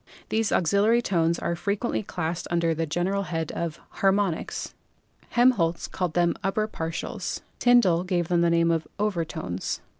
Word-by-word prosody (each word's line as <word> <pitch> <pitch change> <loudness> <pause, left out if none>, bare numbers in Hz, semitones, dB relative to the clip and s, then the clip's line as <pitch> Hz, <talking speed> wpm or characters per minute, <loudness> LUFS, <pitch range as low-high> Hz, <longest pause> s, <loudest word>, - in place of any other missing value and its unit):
These 220 -1 +1
auxiliary 205 +7 +3
tones 170 -4 +1
are 170 - -2
frequently 200 +6 -1
classed 175 -4 -4
under 170 -1 +1
the 160 0 -2
general 180 +6 0
head 165 -4 -3
of 170 -2 -4 0.2
"haromnics." 195 -3 0 0.6
Helm 245 +2 +5
holtz 170 -7 -1
called 180 -3 -3
them 175 -1 +3
"upper 215 +3 0
partials." 165 -5 -4 0.2
Tyndall 215 -9 +4
gave 180 -2 0
them 175 -1 +2
the 170 - +4
name 170 0 +3
of 165 -1 -1
"overtones." 165 - -2
175 Hz, 150 wpm, -26 LUFS, 165-200 Hz, 0.6 s, Helm